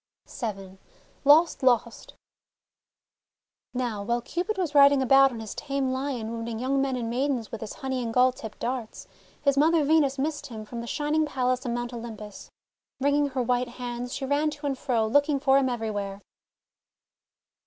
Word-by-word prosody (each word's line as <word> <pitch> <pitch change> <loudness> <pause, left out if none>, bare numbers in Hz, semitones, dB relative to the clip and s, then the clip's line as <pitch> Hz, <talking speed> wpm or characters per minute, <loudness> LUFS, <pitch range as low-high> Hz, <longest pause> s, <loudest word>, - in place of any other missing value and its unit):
vn 195 -4 -6 0.5
LOST! 315 +4 +5
LOST! 240 -3 +1 1.6
Now 240 -5 -2
while 235 +4 0
Cupid 365 - -3
was 350 -6 -1
riding 280 -1 +7
about 270 +1 +6
on 235 - -7
his 220 - -6
tame 275 -2 -2
Lion 260 -4 -3
wounding 230 0 -4
young 265 +3 0
men 270 -1 0
and 240 -2 -3
maidens 250 -1 -1
with 225 - -6
his 220 - -6
honey 265 -1 -3
and 230 -2 -3
gall 255 +2 +4
tipped 225 -5 -9
darts, 245 -3 -4 0.4
his 280 -1 +3
mother 320 +1 +4
Venus 285 -2 +3
missed 290 +1 -2
him 220 -4 -8
from 235 +2 -6
the 235 - -7
Shining 305 +3 0
Palace 255 -2 -1
on 235 - -1
Mount 240 0 -4
Olympus. 220 -3 -8 0.5
Wringing 285 +1 +2
her 260 -2 -2
white 245 +1 0
hands 245 0 -5
she 270 - -3
ran 290 +3 +1
to 295 0 -8
and 275 -1 0
fro, 245 -4 0
looking 285 +5 +2
for 270 0 +4
him 265 -1 +1
everywhere. 205 -4 -3
255 Hz, 170 wpm, -26 LUFS, 235-280 Hz, 1.6 s, riding